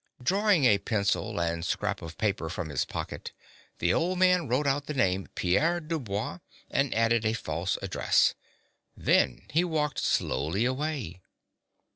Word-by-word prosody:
Drawing 195 Hz, 0 st, +3 dB
a 105 Hz, -5 st, +5 dB
pencil 100 Hz, -5 st, -1 dB
and 85 Hz, -1 st, -1 dB
scrap 105 Hz, +4 st, -1 dB
of 85 Hz, -1 st, -8 dB
paper 100 Hz, -6 st, -1 dB
from 80 Hz, 0 st, -4 dB
his 70 Hz, -3 st, -1 dB
pocket, -, -, -6 dB, 0.4 s
the 85 Hz, +1 st, +1 dB
old 180 Hz, +2 st, 0 dB
man 180 Hz, -2 st, +4 dB
wrote 130 Hz, +5 st, +1 dB
out 140 Hz, +1 st, 0 dB
the 150 Hz, -, -4 dB
name 95 Hz, -7 st, +1 dB
Pierre 160 Hz, -, +2 dB
Du 160 Hz, 0 st, -3 dB
Bois, 105 Hz, -, -4 dB, 0.3 s
and 140 Hz, -1 st, +1 dB
added 115 Hz, 0 st, +2 dB
a 110 Hz, 0 st, +1 dB
false 85 Hz, -3 st, -2 dB
address. 95 Hz, -, +2 dB, 0.6 s
Then -, -, +2 dB
he 165 Hz, +4 st, +3 dB
walked 155 Hz, -4 st, -1 dB
slowly 80 Hz, -, 0 dB
away. 130 Hz, -, -3 dB
115 Hz, 150 wpm, -28 LUFS, 90-150 Hz, 0.6 s, a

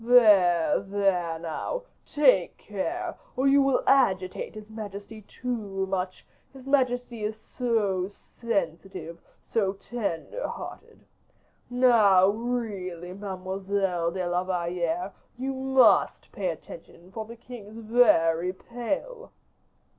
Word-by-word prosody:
There, 205 Hz, -9 st, +5 dB
there 195 Hz, -4 st, 0 dB
now! 170 Hz, -, -4 dB, 0.2 s
take 260 Hz, -, +3 dB
care, 335 Hz, -, -4 dB, 0.2 s
or 265 Hz, +2 st, +2 dB
you 280 Hz, +1 st, +6 dB
will 270 Hz, -1 st, +2 dB
agitate 190 Hz, -11 st, +2 dB
his 215 Hz, -1 st, -9 dB
majesty 215 Hz, 0 st, -8 dB
too 210 Hz, -6 st, -3 dB
much; 185 Hz, -1 st, -3 dB, 0.3 s
his 265 Hz, -1 st, -13 dB
majesty 245 Hz, -4 st, +1 dB
is 210 Hz, +1 st, -2 dB
so 210 Hz, -7 st, 0 dB
sensitive, 185 Hz, -6 st, -4 dB, 0.3 s
so 195 Hz, -4 st, +1 dB
tender 205 Hz, -, -4 dB
hearted. -, -, -9 dB, 0.6 s
Now, 220 Hz, -7 st, +5 dB
really, 200 Hz, -6 st, -3 dB
Mademoiselle 190 Hz, -2 st, -2 dB
de 180 Hz, +1 st, -3 dB
la 175 Hz, +1 st, 0 dB
Valliere, 175 Hz, 0 st, -1 dB, 0.3 s
you 265 Hz, +2 st, -2 dB
must 265 Hz, 0 st, +3 dB
pay -, -, -2 dB
attention, 185 Hz, -, -10 dB
for 220 Hz, +2 st, -5 dB
the 230 Hz, +2 st, -10 dB
king 235 Hz, -3 st, -11 dB
is 215 Hz, +2 st, -11 dB
very 185 Hz, -7 st, +3 dB
pale." 290 Hz, -, -5 dB
205 Hz, 110 wpm, -27 LUFS, 185-245 Hz, 0.6 s, you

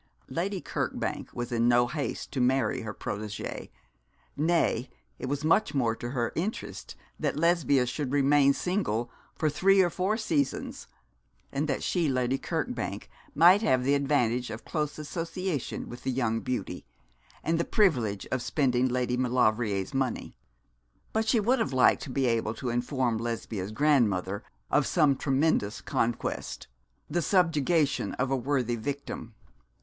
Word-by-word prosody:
Lady 185 Hz, +8 st, -2 dB
Kirkbank -, -, -3 dB
was 120 Hz, 0 st, -5 dB
in 120 Hz, 0 st, +2 dB
no 120 Hz, 0 st, +5 dB
haste 145 Hz, +2 st, -4 dB
to 130 Hz, -, -1 dB
marry 130 Hz, +1 st, +2 dB
her 110 Hz, -, -5 dB
protégée 105 Hz, 0 st, -5 dB, 0.7 s
nay, 150 Hz, -6 st, +1 dB, 0.3 s
it -, -, -4 dB
was 145 Hz, +2 st, -2 dB
much 165 Hz, -1 st, +3 dB
more 115 Hz, -4 st, +2 dB
to 120 Hz, -, -6 dB
her 120 Hz, -2 st, -1 dB
interest 195 Hz, +7 st, -4 dB, 0.2 s
that -, -, -1 dB
Lesbia 155 Hz, -6 st, +3 dB
should 125 Hz, +2 st, -3 dB
remain 140 Hz, 0 st, +4 dB
single 135 Hz, -, -1 dB, 0.2 s
for 155 Hz, -, 0 dB
three 190 Hz, +7 st, +4 dB
or 180 Hz, -2 st, +4 dB
four 190 Hz, +5 st, 0 dB
seasons, 155 Hz, -, -1 dB, 0.6 s
and 145 Hz, +3 st, -1 dB
that 135 Hz, -, -1 dB
she, 170 Hz, -5 st, +1 dB
Lady 130 Hz, 0 st, 0 dB
Kirkbank, -, -, -3 dB, 0.3 s
might 180 Hz, +6 st, +7 dB
have 130 Hz, -, +2 dB
the 140 Hz, +2 st, +2 dB
advantage 125 Hz, -4 st, +1 dB
of 110 Hz, -, -7 dB
close 150 Hz, -2 st, -2 dB
association 165 Hz, 0 st, -3 dB
with 120 Hz, +1 st, -9 dB
the -, -, -3 dB
young 120 Hz, -3 st, 0 dB
beauty, 125 Hz, +1 st, -4 dB, 0.6 s
and 165 Hz, +1 st, +1 dB
the -, -, +2 dB
privilege 125 Hz, -, +1 dB
of 130 Hz, -, 0 dB
spending 130 Hz, -2 st, +1 dB
Lady 125 Hz, 0 st, 0 dB
Maulevrier's 120 Hz, -3 st, +1 dB
money. 135 Hz, -3 st, -2 dB, 0.8 s
But 220 Hz, 0 st, 0 dB
she 230 Hz, 0 st, +4 dB
would 240 Hz, +5 st, +2 dB
have 220 Hz, -11 st, -1 dB
liked 130 Hz, -, +4 dB
to 145 Hz, -, -6 dB
be 130 Hz, +1 st, 0 dB
able 115 Hz, -2 st, 0 dB
to 125 Hz, +1 st, -3 dB
inform 120 Hz, -1 st, 0 dB
Lesbia's 110 Hz, -4 st, -4 dB
grandmother 110 Hz, -8 st, +2 dB, 0.3 s
of 145 Hz, -, +3 dB
some 150 Hz, -5 st, +3 dB
tremendous 135 Hz, -6 st, +1 dB
conquest 115 Hz, 0 st, -2 dB, 0.4 s
the 175 Hz, +3 st, 0 dB
subjugation 165 Hz, -4 st, +2 dB
of 130 Hz, +1 st, -1 dB
a -, -, +3 dB
worthy 130 Hz, -2 st, 0 dB
victim. 120 Hz, -2 st, -5 dB
135 Hz, 150 wpm, -28 LUFS, 120-155 Hz, 0.8 s, might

